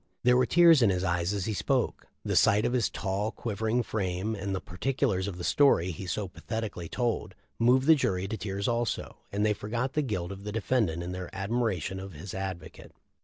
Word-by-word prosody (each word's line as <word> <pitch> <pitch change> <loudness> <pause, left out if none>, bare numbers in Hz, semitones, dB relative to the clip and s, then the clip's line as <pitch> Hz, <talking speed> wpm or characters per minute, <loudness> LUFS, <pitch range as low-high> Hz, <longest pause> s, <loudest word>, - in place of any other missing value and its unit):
There 125 0 +5
were 125 -1 +3
tears 170 -4 +6
in 115 - +5
his 90 -1 0
eyes 85 0 0
as 100 -3 -2
he 110 - -1
spoke. - - -1 0.2
The - - -1
sight 105 +2 +4
of 120 - 0
his 120 -5 +2
tall, 100 +2 -2
quivering 110 +2 -1
frame, 95 0 -2
and 100 -1 -3
the - - -2
par 90 0 -12
ticulars 125 -8 0
of 95 -3 -5
the 90 - -6
story 95 - +4
he 90 +3 -7
so 95 +3 -2
pathetically 105 -3 -5
told, 120 -2 -2 0.2
moved 125 +3 +4
the 160 - +8
jury 95 -10 0
to 110 - -3
tears 100 -1 -3
also, 120 -1 -1
and 105 +1 0
they 105 - +3
forgot 115 +6 -3
the 150 - +1
guilt 100 -9 -3
of 100 0 -8
the 105 - -4
defendant 105 -6 0
in 90 - -5
their 90 -1 -5
admiration 95 -3 -1
of 95 0 -8
his 85 +6 -8
advocate. 95 -4 -6
100 Hz, 215 wpm, -29 LUFS, 95-120 Hz, 0.2 s, the